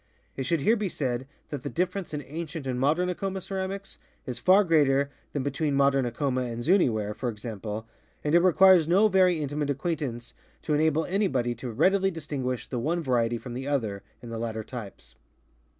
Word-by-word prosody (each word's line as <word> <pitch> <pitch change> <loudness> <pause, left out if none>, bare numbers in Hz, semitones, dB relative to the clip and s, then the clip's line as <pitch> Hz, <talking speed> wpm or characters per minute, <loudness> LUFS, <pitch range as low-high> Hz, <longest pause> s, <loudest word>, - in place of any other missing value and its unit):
It 135 -2 -3
should 165 -1 +1
here 220 +11 +4
be 210 -4 -2
said 130 -4 -2 0.2
that 145 -3 -4
the - - -4
difference 185 +2 -2
in 150 -1 -4
ancient 160 0 -6
and 125 -1 -2
modern 155 +7 +2
Acoma 190 +2 -2
ceramics 195 +1 -5 0.3
is 125 -1 -4
far 190 +9 +5
greater 140 -5 +3 0.2
than 140 - -2
between 140 +1 -1
modern 135 -2 +3
Acoma 130 +2 -1
and 120 -1 -4
Zuiii 175 -4 +4
ware, 105 -1 -2
for 125 +3 -3
example, 110 -1 -5 0.4
and 150 - 0
it 170 - +7
requires 185 -1 +6
no 195 +6 +5
very 185 -3 +4
intimate 145 0 -2
acquaintance 140 -5 -3 0.3
to 155 - -1
enable 155 +1 +2
anybody 155 - 0
to 120 +2 -7
readily 190 - +3
distinguish 140 -7 -4
the 125 - -4
one 165 +7 -1
variety 120 -3 +1
from 120 +2 -8
the 130 +3 -5
other 110 -9 -1 0.2
in 120 - -8
the 115 - -4
latter 110 -1 -3
types. 115 -4 -9
140 Hz, 185 wpm, -27 LUFS, 125-175 Hz, 0.4 s, it